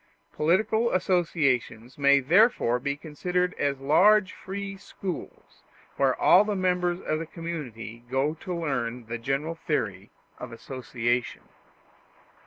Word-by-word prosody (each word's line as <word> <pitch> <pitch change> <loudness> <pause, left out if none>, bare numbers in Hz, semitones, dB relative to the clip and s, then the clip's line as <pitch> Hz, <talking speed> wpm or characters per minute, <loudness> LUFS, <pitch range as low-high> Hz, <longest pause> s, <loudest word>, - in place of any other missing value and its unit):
Political 215 +9 +2
associations 145 - 0
may 140 0 +5
therefore 165 - +3
be 140 +2 -2
considered 180 +4 -2
as 140 -1 0
large 185 +8 +4
free 195 +1 -6
schools, 190 -1 -8 0.3
where 135 -2 +1
all 185 - +6
the 210 -1 -2
members 180 -1 0
of 155 - -2
the 165 - -5
community 125 - -7
go 135 +4 0
to 185 - -7
learn 125 -8 -2
the 115 +1 -5
general 135 +7 -2
theory 110 - -3 0.3
of 125 - -7
association. 120 0 -3
150 Hz, 120 wpm, -26 LUFS, 125-180 Hz, 0.3 s, all